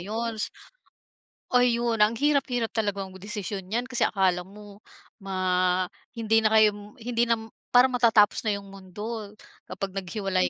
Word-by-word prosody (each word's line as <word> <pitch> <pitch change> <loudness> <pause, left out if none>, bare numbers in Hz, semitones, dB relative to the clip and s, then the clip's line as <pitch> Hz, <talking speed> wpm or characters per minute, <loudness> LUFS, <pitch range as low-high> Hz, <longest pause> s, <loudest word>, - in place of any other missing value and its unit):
'yons 220 +3 -3 1.1
Ayun, 235 -2 +3
ang 220 +2 +4
hirap-hirap 270 -5 +1
talagang 200 -3 -2
desisyon 200 0 -5
niyan, 240 +3 -1
kasi 255 -1 -4
akala 185 -3 +2
mo 205 +2 -13 0.4
ma 185 -1 +1 0.3
hindi 225 0 +3
na 215 - +3
kayo, 210 +1 +2
hindi 235 0 -1
na 230 - +3 0.3
parang 250 +1 +5
matatapos 230 -4 +4
na 210 -2 0
yung 200 0 -11
mundo, 205 +3 -7 0.4
kapag 195 -1 -5
naghiwalay 195 -1 -1
210 Hz, 130 wpm, -26 LUFS, 195-230 Hz, 1.1 s, parang